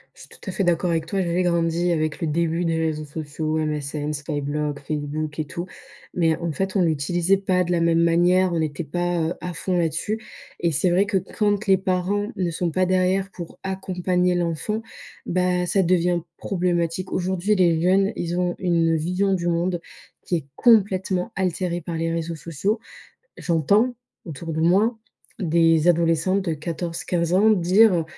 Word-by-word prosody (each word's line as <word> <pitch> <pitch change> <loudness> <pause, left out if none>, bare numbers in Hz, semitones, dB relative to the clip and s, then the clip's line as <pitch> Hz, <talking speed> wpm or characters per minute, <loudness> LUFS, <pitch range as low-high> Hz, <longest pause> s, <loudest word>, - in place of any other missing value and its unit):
Je - - -20
suis - - -14
tout - - -16
à 190 - -1
fait 195 - -1
d'accord 175 0 +1
avec 165 -1 -1
toi. 195 +1 -1
J'avais 175 +1 0
grandi 170 0 +1
avec 155 0 -1
le 165 - 0
début 170 +2 0
des 165 -1 0
réseaux 155 -1 -1
sociaux: 155 +1 -3
MSN, 150 -1 -2
Skyblog, 145 0 -3
Facebook 150 +1 -4
et 155 - -1
tout. 170 +4 -5 0.5
Mais 165 -2 +2
en 170 -1 -3
fait, 190 +6 -3
on 195 - +3
l'utilisait 175 +4 +1
pas 185 -2 +1
de 175 - -3
la 170 -1 +2
même 165 0 +3
manière. 175 +2 +3
On 165 - 0
était 155 +1 -2
pas, 175 +3 -1
heu, - - -2
à 180 -1 -4
fond 180 +2 -2
là-dessus. 170 +6 -1 0.4
Et 170 -1 +1
c'est 175 +5 +1
vrai 195 +3 +3
que 200 -2 +1
quand 205 +2 -1
les 190 -1 +5
parents 190 +2 -1
ne 175 -3 -1
sont 170 +1 -1
pas 185 +3 +1
derrière 185 +1 +1
pour 170 -2 -9
accompagner 180 -1 0
l'enfant, 175 +6 -2 0.4
bah, 180 0 +1
ça 195 +2 +2
devient 175 0 +2 0.2
problématique. 175 -1 -1
Aujourd'hui, 190 +3 0
les 170 -3 +3
jeunes, 195 +3 +3
ils 175 +1 -3
ont 180 -1 0
une 165 -3 +2
vision 180 +5 0
du 175 -2 -1
monde 175 +1 0 0.4
qui 175 - -2
est 155 - -3
complètement 190 -5 +3
altérée 180 -2 -1
par 165 +1 -5
les 165 0 -1
réseaux 165 0 -3
sociaux. 170 - -2 0.6
J'entends 200 - +2 0.3
autour 165 0 -6
de 160 - -2
moi 200 +8 +3 0.4
des 165 -2 +3
adolescentes 170 +3 +2
de 165 - 0
14-15 170 +2 -2
ans 210 +4 +5
dire: 185 -1 +4
175 Hz, 175 wpm, -23 LUFS, 165-185 Hz, 0.6 s, les